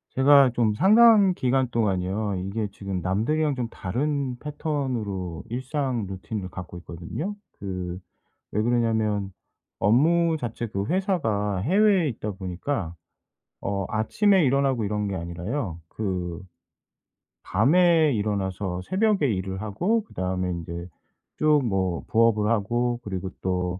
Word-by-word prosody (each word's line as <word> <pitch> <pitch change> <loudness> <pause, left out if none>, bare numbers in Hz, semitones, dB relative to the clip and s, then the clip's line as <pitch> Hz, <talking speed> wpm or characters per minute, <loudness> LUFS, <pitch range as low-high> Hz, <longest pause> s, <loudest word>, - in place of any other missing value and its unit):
제가 140 0 +6
좀 110 -3 +2
상당 210 - +6
기간 130 -1 +1
동안요. 100 -2 0
이게 100 +4 -3
지금 100 -2 -5
남들이랑 135 - 0
좀 125 -2 -2
다른 130 +5 -2
패턴으로 125 - -3
일상 130 -2 -2
루틴을 95 +1 -5
갖고 90 -1 -8
있거든요. 85 - -6 0.2
그 90 -2 -4 0.5
왜 105 - +1
그러냐면 110 -4 +1 0.5
업무 160 - +3
자체도 115 -5 -3
회사가 115 - 0
해외에 190 - +3
있다 110 -5 -4
보니까 95 - -4 0.7
어 100 -2 -2
아침에 190 - +3
일어나고 135 -3 +2
이런 105 0 -1
게 100 - -3
아니라요. 90 - -4
그 90 -5 -3 1.0
밤에 160 - +4
일어나서 100 -3 -2
새벽에 195 - +1
일을 95 0 -3
하고 175 - 0
그다음에 90 - -3
인제 85 0 -5 0.5
쭉 155 -1 +4
뭐 95 -5 -1
부업을 110 -2 +3
하고 120 +2 0
그리고 95 -2 -4
또 90 -1 -1
110 Hz, 260 characters per minute, -25 LUFS, 95-140 Hz, 1.0 s, 제가